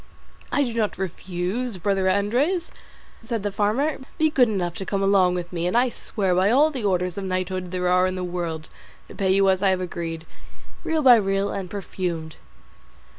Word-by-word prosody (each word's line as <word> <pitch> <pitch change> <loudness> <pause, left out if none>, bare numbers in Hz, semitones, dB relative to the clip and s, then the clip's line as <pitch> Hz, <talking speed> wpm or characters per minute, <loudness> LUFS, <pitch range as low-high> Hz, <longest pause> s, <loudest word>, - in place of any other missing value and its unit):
"I 285 - +2
do 240 -4 -3
not 220 -3 -1
refuse, 190 +5 -3
brother 190 0 +1
Andres," 250 - +1 0.5
said 225 -2 -3
the 205 - -1
farmer, 220 +10 0 0.2
"be 315 0 +3
good 250 -5 +4
enough 180 -5 -1
to - - -4
come 195 0 -1
along 190 -2 +4
with 175 0 -5
me, 170 0 -1
and 180 - +1
I 250 +1 +4
swear 195 -5 -2
by 185 +3 +3
all 290 +7 +4
the 260 -6 -4
orders 180 -2 0
of - - -5
knighthood 185 -1 -2
there 180 0 -2
are 180 +1 +4
in 185 - -3
the 185 - -3
world 170 -3 -4 0.4
to - - -10
pay 195 -2 -1
you 195 +1 +4
as 190 -1 +3
I 200 - +4
have 185 -1 +1
agreed, 165 -2 -5 0.6
real 320 -1 0
by 250 -3 +8
real, 195 -1 0
and 190 -2 -4
perfumed." 175 -5 -4
195 Hz, 195 wpm, -24 LUFS, 180-220 Hz, 0.6 s, by